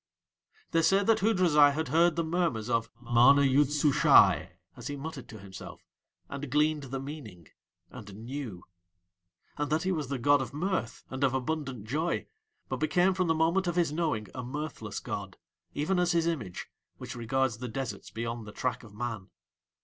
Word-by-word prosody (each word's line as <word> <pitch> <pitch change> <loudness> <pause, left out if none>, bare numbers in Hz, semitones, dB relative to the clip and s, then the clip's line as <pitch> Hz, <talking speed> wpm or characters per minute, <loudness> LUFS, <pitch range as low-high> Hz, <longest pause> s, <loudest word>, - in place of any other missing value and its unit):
They 165 - +3
say 195 +4 +4
that 225 +2 +3
Hoodrazai 175 -9 +4
had 160 0 -2
heard 165 +3 +4
the 165 - 0
murmers 160 -9 -1
of 115 -2 +1
MANA 125 +4 +5
YOOD 140 +1 +4
SUSHAI 150 -1 +5 0.3
as - - -8
he 145 - -4
muttered 145 -1 -7
to 110 - -9
himself, 95 -2 -11 0.4
and 140 0 -6
gleaned 150 +1 +1
the 135 +1 -4
meaning, 130 - -9 0.4
and 105 -5 -10
knew; 115 -4 -6 0.9
and 145 0 -2
that 155 +1 +1
he 190 - 0
was 155 -6 -2
the 140 +1 -2
god 145 +3 +4
of 135 +2 -6
mirth 180 -6 -2
and 130 +1 -3
of 130 -2 +2
abundant 135 -4 -3
joy, 155 +9 -1 0.4
but - - -3
became 180 +4 +2
from 185 -1 0
the 160 - +2
moment 170 +4 +2
of 175 - -1
his 170 -4 +2
knowing 150 -10 -1
a 130 - -5
mirthless 145 +5 -5
god, - - -6 0.4
even 180 +6 0
as 175 0 +2
his 165 -1 +2
image, 125 - -3 0.3
which - - -7
regards 120 0 -1
the 125 - -4
deserts 130 +2 -5
beyond 115 -1 -5
the - - -7
track 125 +4 -2
of 105 -3 -14
man. 110 -4 -5
140 Hz, 180 wpm, -29 LUFS, 120-160 Hz, 0.9 s, MANA